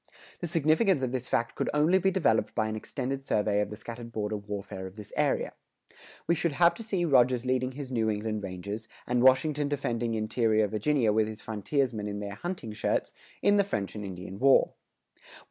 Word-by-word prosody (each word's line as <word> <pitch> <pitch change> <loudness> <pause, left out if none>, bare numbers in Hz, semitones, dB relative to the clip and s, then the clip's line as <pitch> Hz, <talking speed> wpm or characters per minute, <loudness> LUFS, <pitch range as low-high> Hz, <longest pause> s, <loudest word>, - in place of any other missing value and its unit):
The 175 - -3
significance 160 +1 +2
of 125 - 0
this 125 -1 -3
fact 115 -1 0
could - - -2
only 160 +6 +4
be 190 +1 +3
developed 165 - +1
by 110 - +1
an 110 - -3
extended 135 +4 -4
survey 105 -4 +1
of 105 - -2
the 105 - -6
scattered 115 +2 -8
border 105 -1 -2
warfare 100 -2 -6
of 95 - -12
this 105 -2 -11
era. - - +1 0.7
We 170 - +3
should 170 -1 0
have 170 +3 +5
to - - -9
see 195 -6 -1
Rogers 130 -4 +4
leading 130 0 0
his 135 -1 -7
New 115 -3 +1
England 105 0 -2
Rangers, 100 +4 -5 0.2
and 125 0 +1
Washington 145 +3 +4
defending 120 -5 -1
interior 110 0 +2
Virginia 110 +2 +1
with 110 0 +2
his 110 -1 -8
frontiersmen 110 0 -1
in 100 0 -4
their 100 -1 -5
hunting 145 - -5
shirts, - - -1 0.3
in 205 0 +5
the 200 - +5
French 100 - -3
and 105 - -6
Indian 95 0 -7
War. 135 +1 +5
115 Hz, 195 wpm, -29 LUFS, 105-145 Hz, 0.7 s, have